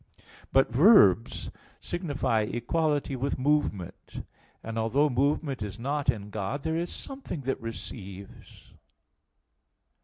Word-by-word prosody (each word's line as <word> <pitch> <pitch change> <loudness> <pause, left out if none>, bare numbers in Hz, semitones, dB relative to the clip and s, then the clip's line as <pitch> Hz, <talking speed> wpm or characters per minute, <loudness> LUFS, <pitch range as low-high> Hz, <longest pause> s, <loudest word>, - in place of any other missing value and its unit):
But 135 -1 +4
verbs 125 - +5 0.3
signify 145 - -1
equality 145 +3 0
with 135 +2 -2
movement. 130 - -1 0.4
And 115 0 -4
although 135 +7 +2
movement 140 0 0
is 105 -1 -5
not 140 +4 -1
in 105 -1 -1
God, 110 +7 -3
there 160 +1 -1
is 170 +1 -2
something 270 - -7
that 135 0 -2
receives. 100 -4 -9
135 Hz, 110 wpm, -28 LUFS, 110-150 Hz, 0.4 s, verbs